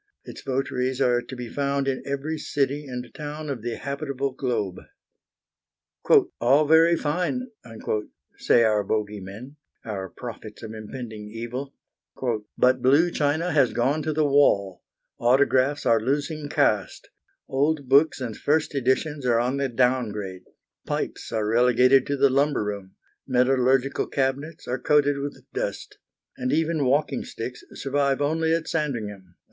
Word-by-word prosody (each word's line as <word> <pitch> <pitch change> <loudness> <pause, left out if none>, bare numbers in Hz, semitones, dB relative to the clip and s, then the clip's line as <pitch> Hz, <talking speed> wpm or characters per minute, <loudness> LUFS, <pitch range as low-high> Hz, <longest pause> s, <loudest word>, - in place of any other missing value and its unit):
Its - - -9
votaries 130 -1 -1
are 125 -2 +3
to 130 - -9
be 125 -1 -6
found 140 +2 -1
in 130 -1 -1
every 140 +3 -2
city 145 -1 -1
and 125 -1 -7
town 150 0 -6
of 125 -5 -5
the 120 0 -3
habitable 140 -1 -3
globe. 115 -8 -2 1.6
"All 135 +6 +4
very 165 +2 +5
fine," 180 - -1 0.9
say 115 - +3
our 105 -2 +2
bogey 105 0 -2
men, 110 +10 -10 0.3
our 95 -4 -4
prophets 110 -1 -9
of 110 0 -7
impending 110 -1 -8
evil; 120 +5 -6 0.8
"but 125 0 +3
blue 145 +8 +4
china 155 +4 0
has 140 -5 +3
gone 135 +6 +1
to 155 - -1
the 155 0 +1
wall, 100 -10 +3 0.4
autographs 130 +3 +3
are 115 -1 +4
losing 145 +4 -2
caste, - - 0 0.4
old 145 +1 0
books 140 +4 +4
and 120 -4 -4
first 155 +1 0
editions 140 +2 0
are 120 -1 +4
on 125 +3 0
the 140 -1 0
downgrade, 110 -7 -1 0.4
pipes - - -3
are 110 -2 0
relegated 125 +3 +4
to 140 - -1
the 140 0 +4
lumber 140 -2 +2
room, 100 -2 -6 0.3
metallurgical 130 +1 +2
cabinets 140 +4 -2
are 125 +1 -2
coated 145 -1 +3
with 140 0 -6
dust, - - -4 0.4
and 125 0 -2
even 160 -2 +1
walking 140 +1 +1
sticks 125 +2 -7
survive 140 0 0
only 160 +3 +1
at 165 0 0
Sandringham!" 105 - -3
135 Hz, 140 wpm, -25 LUFS, 120-145 Hz, 1.6 s, very